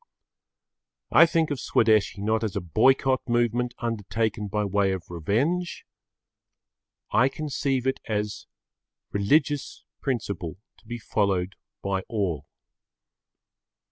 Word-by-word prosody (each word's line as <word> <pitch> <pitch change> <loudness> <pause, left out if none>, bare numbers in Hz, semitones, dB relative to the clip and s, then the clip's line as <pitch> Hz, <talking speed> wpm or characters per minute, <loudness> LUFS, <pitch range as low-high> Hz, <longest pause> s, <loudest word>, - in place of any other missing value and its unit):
I 170 - +8
think 160 -2 +1
of 140 - -2
Swadeshi 110 -3 +2
not 110 +1 +1
as 105 -4 -2
a - - +1
boycott 130 - +3
movement 120 +1 +1
undertaken 110 -2 -2
by 105 +1 -1
way 100 -1 +2
of 90 -2 -6
revenge. 130 - -1 1.3
I 130 +3 +4
conceive 135 -3 -2
it 130 - 0
as 105 -1 -3 0.6
religious 145 +8 +1 0.2
principle 100 - -3 0.2
to - - -25
be 120 - -4
followed 100 -4 0 0.3
by 95 -1 0
all. 90 -10 -2
110 Hz, 110 wpm, -26 LUFS, 100-130 Hz, 1.3 s, I